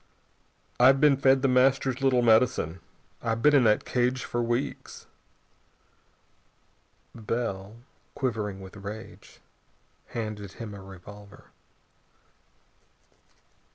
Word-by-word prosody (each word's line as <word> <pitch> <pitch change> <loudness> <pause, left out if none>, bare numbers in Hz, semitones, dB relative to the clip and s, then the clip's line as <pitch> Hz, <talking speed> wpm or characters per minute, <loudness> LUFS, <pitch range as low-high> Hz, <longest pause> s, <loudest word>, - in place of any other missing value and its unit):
I've 130 +2 +6
been 145 -1 +5
fed 135 0 +3
The - - +4
Master's 130 0 +2
little 130 -2 +3
medicine. 110 -7 +2 0.4
I've 115 -1 -2
been 150 - +5
in 135 -4 +5
that 105 -1 +3
cage 125 +1 0
for 120 - -2
weeks." 120 +3 -3 2.1
Bell, 110 -3 -4 0.4
quivering 105 -7 -3
with 95 -1 -11
rage, 105 +2 -10 0.7
handed 105 -4 -6
him 110 -3 -8
a 100 - -9
revolver. 100 +2 -14
115 Hz, 95 wpm, -27 LUFS, 105-130 Hz, 2.1 s, I've